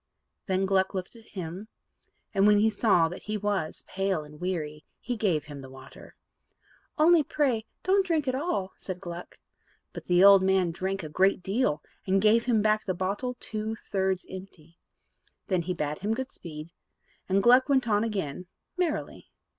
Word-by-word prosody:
Then 190 0 +1
Gluck 190 0 +1
looked 185 +4 -5
at 225 -1 -16
him, 180 +4 -5 0.7
and, 195 0 +4
when 210 0 +6
he 220 +2 +3
saw 200 -6 +3
that 175 +3 -8
he 215 0 -3
was 200 -6 -2
pale 195 -4 -1
and 150 +2 -14
weary, 155 -5 -3 0.2
he 245 - -3
gave 185 -9 +1
him 145 -2 -9
the 130 - -10
water. 130 0 -13 0.8
"Only 330 +1 +6
pray 260 -7 0 0.2
don't 385 +1 +3
drink 325 -6 0
it 255 - +1
all," 255 - -2
said 185 -2 -6
Gluck. 175 -1 -8 0.6
But - - -8
the 180 +1 +4
old 200 -1 +9
man 190 -2 +2
drank 190 +2 -3
a - - -4
great 185 +4 +2
deal, 195 - 0 0.2
and 190 +1 +3
gave 220 +3 +4
him 225 -4 +2
back 215 0 +2
the 185 -4 -2
bottle 205 +8 -2
two 215 +1 -4
thirds 190 -3 -2
empty. 180 -3 -11 0.7
Then 185 -4 0
he 180 +2 -2
bade 150 -2 -3
him 210 +3 -1
good 265 +2 -5
speed, 155 -1 -9 0.6
and 195 +1 +2
Gluck 250 +4 +6
went 265 -3 +3
on 210 -1 +2
again 185 -6 -3 0.3
merrily. 345 -4 -2
195 Hz, 175 wpm, -28 LUFS, 180-220 Hz, 0.8 s, old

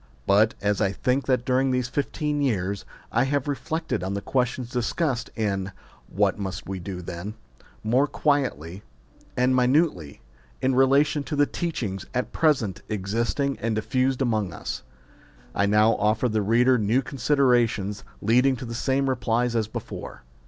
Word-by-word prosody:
But, 105 +3 +4
as 105 +1 +1
I 100 -2 +2
think 125 +7 0
that 125 -2 +1
during 130 +1 +2
these 125 -1 0
fifteen 145 +3 -2
years 100 -7 -1 0.3
I 120 +3 +2
have 145 0 -1
re 145 - +1
flected 155 -1 -3
on 95 +1 -2
the - - -1
questions 125 0 -1
discussed 125 +1 -1
in 100 -3 -1 0.4
What 100 +1 +1
Must 95 -3 -5
We 95 0 -4
Do 90 0 -6
Then? 85 +5 -6 0.5
more 125 +6 +3
quietly 125 - -1 0.6
and 125 +1 +3
minutely, 125 - +1 0.4
in 130 - +1
relation 140 +3 +4
to 150 - -3
the 145 0 +4
teachings 115 - -4
at 125 - -1
present 125 - +1
existing 115 +7 -1
and 115 -1 -1
diffused 130 +4 0
among 110 -7 0
us, - - -5 0.7
I 100 - +2
now 105 +2 +4
offer 110 +4 +2
the 110 -2 0
reader 120 +4 +4
new 110 +6 +2
con 135 - -8
siderations 120 -7 +2 0.2
leading 125 +5 +4
to 125 0 -7
the 115 - -6
same 135 +3 0
replies 120 -1 0
as 110 -2 +1
before. 110 - -7
120 Hz, 160 wpm, -25 LUFS, 105-135 Hz, 0.7 s, But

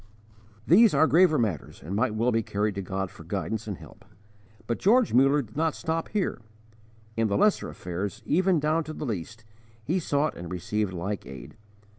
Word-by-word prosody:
These 210 +6 +6
are - - +5
graver 165 -1 +5
matters 100 - -2
and 90 +6 -4
might 110 0 +1
well 115 +3 +2
be 115 -1 +2
carried 105 0 -1
to 100 - -4
God 95 0 -3
for - - -13
guidance 110 0 -3
and 100 -4 -4
help. - - -14 0.6
But 120 - -2
George 235 +4 +4
Muller 135 +3 +4
did 110 -1 -17
not 160 +1 0
stop 165 0 -2
here. 195 - -1 0.7
In 115 -1 +1
the 100 - 0
lesser 210 -1 +2
affairs, 100 +6 -5
even 180 - +2
down 155 +2 +1
to 155 - -6
the 150 - -5
least, 110 0 -5 0.4
he 170 +10 0
sought 150 -2 0
and 85 0 -8
received 100 +3 -2
like 95 +3 -4
aid. 65 -3 -10
115 Hz, 185 wpm, -27 LUFS, 100-160 Hz, 0.7 s, These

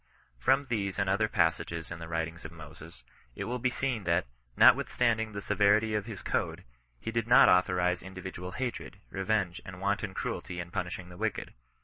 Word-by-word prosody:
From 135 - +3
these 105 -6 -2
and 100 -1 0
other 100 +3 +2
passages 85 -4 0
in 85 - -6
the 80 - -7
writings 80 +1 -3
of 80 - -8
Moses, 80 0 -12 0.3
it - - -4
will 125 +1 -3
be 125 +2 +1
seen 125 -4 -2
that, 85 +1 +2 0.3
notwithstanding 110 -3 +4
the 100 0 -5
se - - -1
verity 105 +2 +3
of 105 0 -2
his 110 -4 -7
code, - - -2 0.4
he 115 - -4
did 115 -1 -1
not 120 - +8
authorize 90 -1 +3
individual 95 0 -7
haixed, 125 -6 -4
revenge, 95 -2 -1
and 90 0 -9
wanton 100 0 -1
cruelty 90 -1 -4
in 85 0 -6
punishing 90 -1 -4
the 90 - -11
wicked. 110 +1 -3
95 Hz, 185 wpm, -30 LUFS, 85-110 Hz, 0.4 s, not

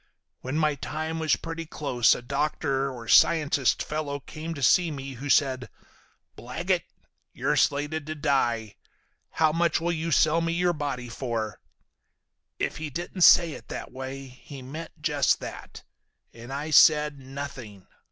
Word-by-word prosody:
When 130 +4 -4
my 155 -1 +2
time 160 +3 -4
was 155 -3 +2
pretty 165 -1 -6
close 125 -7 +2
a - - -8
doctor 140 0 -1
or 120 -3 -9
scientist 145 -3 +4
fellow 150 -2 -3
came 160 +4 -7
to 140 - -5
see 175 +5 +4
me 135 -2 -6
who 135 +4 -7
said, 130 -3 +2 0.7
'Blaggett, - - -2 0.5
you're - - 0
slated 145 +1 0
to 155 - -4
die. 120 -7 0 0.5
How 160 -1 +2
much 165 0 +1
will 170 +1 -1
you 165 0 -2
sell 155 +2 +3
me 165 0 -1
your 175 0 +1
body 140 -5 -4
for?' 115 -3 -4 1.0
If - - -2
he 155 -1 -5
didn't 175 +5 -6
say 170 -1 +7
it - - -10
that - - -7
way 135 +1 -7
he 130 +1 -12
meant 155 +5 -9
just - - +2
that. - - -9 0.5
And 120 +2 -11
I 145 +3 -4
said, 150 -1 +5
'Nothing. 130 -7 -8
145 Hz, 150 wpm, -26 LUFS, 130-160 Hz, 1.0 s, say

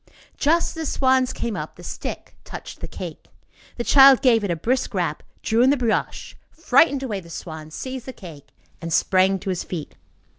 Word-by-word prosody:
Just 330 +4 +2
as - - -9
the 320 -1 -5
swans 260 -1 +2
came 230 -3 -4
up, - - -6
the - - -14
stick - - -7
touched - - -9
the - - -6
cake. - - -8 0.5
The 240 - -2
child 275 +1 +7
gave 230 -4 +4
it 200 - -2
a 170 - 0
brisk 245 +10 -1
rap, - - -1 0.2
drew 225 +1 +2
in 255 - +5
the 285 - +3
brioche, 235 -3 -2
frightened 280 -2 +3
away 215 -7 -3
the 170 -3 -14
swans, 155 -1 -8
seized 260 -1 -6
the 260 - -6
cake, 160 - -12 0.3
and 165 0 -5
sprang 190 +3 +3
to 195 +1 -6
his 180 - -3
feet. 165 -5 -6
235 Hz, 195 wpm, -22 LUFS, 185-265 Hz, 0.5 s, child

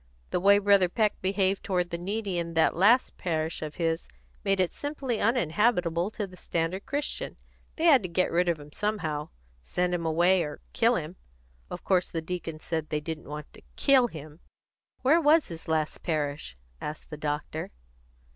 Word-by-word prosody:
The - - +1
way 200 +2 +6
Brother 200 -3 +4
Peck 215 +2 0
behaved 190 0 +1
toward 180 -2 -1
the 170 - -2
needy 195 0 -2
in 170 -1 -4
that 160 - +3
last 215 +9 +4
parish 160 -2 -2
of 155 -1 -5
his 165 -1 -1 0.4
made 195 -1 +1
it 185 -2 +2
simply 275 -6 -3
uninhabitable 185 -4 +2
to 215 -1 -4
the 185 -1 -13
standard 175 +2 -2
Christian. 285 +2 -3 0.4
They 320 - -4
had 285 -7 +7
to 185 - -5
get 185 +2 +1
rid 175 +1 +2
of 165 -3 0
him 145 0 -12
somehow 160 -7 -2 0.3
send 180 - -1
him 175 -1 -1
away 175 +3 +3
or 150 - -4
kill - - +3
him. - - -4 0.5
Of - - -7
course 185 -2 +2
the 165 - -2
deacon 165 -1 -5
said 160 -1 -3
they 150 - 0
didn't 155 -1 -6
want 150 0 -7
to - - -15
kill 265 -3 +5
him." 155 -4 -10 0.6
"Where 310 +6 +5
was 310 +1 +4
his 165 -1 -8
last 155 -1 -1
parish?" 145 - -2 0.2
asked 150 +1 -6
the 150 - -5
doctor. 150 +1 -3
175 Hz, 180 wpm, -28 LUFS, 160-205 Hz, 0.6 s, had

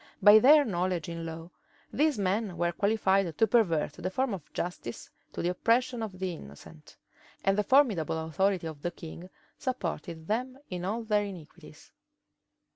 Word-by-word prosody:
By 205 +1 +8
their 290 +5 +7
knowledge 180 -4 -1
in 165 0 -5
law, 165 +1 -8 0.4
these 300 -2 +2
men 195 -1 -1
were 170 0 +1
qualified 195 -3 +1
to 225 - +5
pervert 180 -13 +2
the 180 +3 -4
forms 255 +4 -1
of 175 -6 -8
justice 170 -9 -5 0.2
to - - -5
the 175 - +1
oppression 235 +6 +1
of 205 -4 -5
the 185 -1 -3
innocent; 75 - -13 0.5
and 195 - +3
the 210 - +1
formidable 210 - +3
authority 175 +3 0
of 155 -3 -7
the 175 - -1
king 170 +1 -10 0.3
supported 170 - -4
them 250 +6 -2
in 180 0 -4
all 220 +4 -2
their 210 -2 +1
iniquities. 180 -6 -12
185 Hz, 160 wpm, -29 LUFS, 165-220 Hz, 0.5 s, By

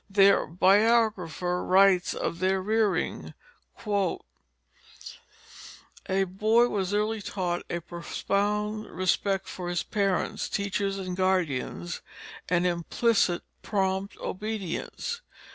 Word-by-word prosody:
Their 200 0 +5
biographer 190 -2 +2
writes 190 -1 +4
of 170 - -3
their 190 +1 +2
rearing: 215 +1 0 2.7
"A 190 +1 +2
boy 215 +6 +3
was 195 -2 -1
early 210 +1 0
taught 180 -3 -2
a 170 - -2
profound 210 +5 -2
respect 190 +2 0
for 180 -1 -5
his 175 -1 -1
parents, 200 -3 -1
teachers, 200 -1 -1
and 185 -2 -4
guardians, 170 - -1 0.5
and 180 0 +2
implicit 175 +2 +1 0.2
prompt 190 -1 -1
obedience. 215 - -4
195 Hz, 95 wpm, -27 LUFS, 180-210 Hz, 2.7 s, Their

